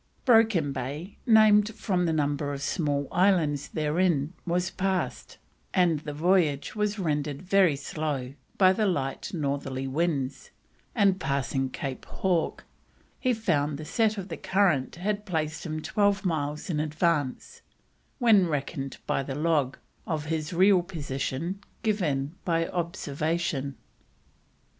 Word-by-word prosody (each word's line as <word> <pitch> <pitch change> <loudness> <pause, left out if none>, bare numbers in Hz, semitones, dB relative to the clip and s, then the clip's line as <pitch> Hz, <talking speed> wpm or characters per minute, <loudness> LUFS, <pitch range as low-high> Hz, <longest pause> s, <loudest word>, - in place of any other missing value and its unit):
Broken 220 - +4
Bay, 145 +9 -5
named 215 -1 +6
from 185 -5 0
the - - +2
number 145 -2 0
of 140 0 -5
small 145 -5 0
islands 165 -7 +2
therein, 155 0 0
was 175 +1 0
passed, 190 0 -2 0.4
and 175 -5 +3
the 150 0 -6
voyage 155 -1 +1
was 210 0 0
rendered 150 -4 -2
very 185 -4 +4
slow 140 -2 -3 0.2
by 185 -1 +6
the 215 +1 +1
light 135 -7 -2
northerly 140 -4 -2
winds, 140 -2 -1 0.5
and 200 -4 +3
passing 135 -3 -1
Cape 130 0 -5
Hawke, 180 -4 -1 0.5
he 255 - +1
found 150 - 0
the 155 - -7
set 220 +3 +1
of 195 0 -5
the 165 - -5
current 185 -9 +1
had 205 +4 -2
placed 160 -4 -3
him 155 0 -4
twelve 205 -1 +1
miles 150 -3 -2
in 150 - -1
advance, 155 - -1 0.6
when 220 -8 +5
reckoned 140 -2 -3
by - - 0
the 135 0 -5
log, 150 -4 +1 0.3
of 155 -3 -2
his 155 -1 -2
real 185 +1 +5
position 165 0 -4 0.2
given 155 -10 0
by 165 -1 +1
observation. 160 -4 -2
160 Hz, 130 wpm, -27 LUFS, 145-190 Hz, 0.6 s, named